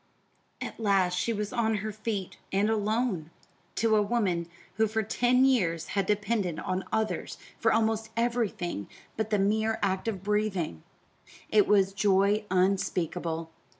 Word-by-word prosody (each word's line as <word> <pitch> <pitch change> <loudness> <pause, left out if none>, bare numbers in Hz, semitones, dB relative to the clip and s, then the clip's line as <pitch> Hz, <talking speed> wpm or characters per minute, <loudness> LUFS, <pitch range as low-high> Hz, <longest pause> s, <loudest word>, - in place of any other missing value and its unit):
At - - -6
last 195 -4 +2
she 230 - 0
was 210 -2 -3
on 225 -2 +1
her 215 +1 -3
feet, 215 -3 -4
and 205 +3 +2
alone. 215 -5 0 0.5
To 225 -1 +3
a 210 - +4
woman 200 -6 0 0.3
who 220 0 +3
for 220 +1 -1
ten 245 +4 +3
years 180 -12 +1
had 195 -2 0
depended 205 -4 0
on 185 +1 -2
others 220 0 -1 0.2
for - - +3
almost 220 0 +1
everything 230 - -1 0.3
but 220 -1 -2
the 210 - +2
mere 220 +3 +1
act 190 +2 0
of 195 -5 -3
breathing, 195 - -1 0.7
it 210 -2 +5
was 195 -2 +4
joy 200 +1 +2
unspeakable. 175 -3 0
205 Hz, 145 wpm, -28 LUFS, 190-220 Hz, 0.7 s, it